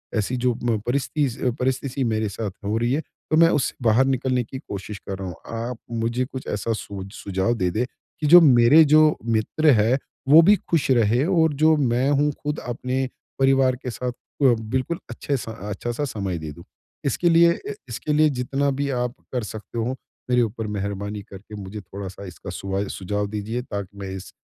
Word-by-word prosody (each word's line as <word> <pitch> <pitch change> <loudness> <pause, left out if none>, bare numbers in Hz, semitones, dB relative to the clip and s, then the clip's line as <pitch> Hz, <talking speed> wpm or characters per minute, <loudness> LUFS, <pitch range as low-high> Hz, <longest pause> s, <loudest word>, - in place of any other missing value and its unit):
ऐसी 110 +3 0
जो 125 0 +1
म 120 -2 +1
परिस्तिस 140 0 0
अ 125 - +3
परिस्थिति 130 +1 -1
मेरे 110 -3 0
साथ 105 0 -4
हो 105 +2 0
रही 120 +3 +1
है। 150 - +1
तो, 155 0 -4
मैं 165 0 +7
उससे 150 - 0
बाहर 115 +3 +4
निकलने 130 -1 +1
की 130 +4 -8
कोशिश 100 -2 -7
कर 95 -1 -3
रहा 95 - -4
हूँ। 90 - -6 0.3
आप 125 - -5
मुझे 115 +2 -1
कुछ 130 0 -8
ऐसा 105 +3 -1
सोझ 100 -3 -6
सुझाव 95 +4 -1
दे 90 -5 0
दे, 115 +7 0 0.3
कि 150 - 0
जो 175 +4 +10
मेरे 135 +1 +7
जो 155 +1 +5
मित्र 115 +7 +2
है, 115 +5 +3 0.3
वो 155 +3 +10
भी 200 +5 +6
खुश 165 -5 +1
रहे 120 +1 +3
और 165 -4 +3
जो 155 +2 +4
मैं 130 -1 +2
हूँ 145 +1 +3
खुद 150 +1 -2
अपने 125 +2 -2 0.3
परिवार 135 -1 +4
के 125 0 -6
साथ 125 +1 -3
अ, 140 +3 -5
बिल्कुल 130 +6 +1
अच्छे 135 +4 -2
सा 115 - -6 0.2
अच्छा-सा 120 +6 -3
समय 100 -8 -3
दे 80 -1 -6
दूँ। 85 +3 -12 0.4
इसके 170 +5 +2
लिए 170 0 +6
अ 420 - -6 0.2
इसके 150 - -2
लिए 155 0 +5
जितना 140 +3 0
भी 140 +1 -2
आप 125 -1 -1 0.2
कर 125 -3 -1
सकते 110 +2 -8
हो, 125 +3 -1 0.3
मेरे 125 0 +4
ऊपर 110 -1 -2
मेहरबानी 100 +1 -4
करके 100 +2 -10
मुझे 100 +2 -7
थोड़ा-सा 95 +1 -8
इसका 95 +2 -9
सुवा 95 +2 -3
सुझाव 105 +2 -2
दीजिए 110 +4 -3
ताकि 100 -4 -6
मैं 95 - -5
इस 95 0 -9
120 Hz, 195 wpm, -23 LUFS, 105-140 Hz, 0.4 s, जो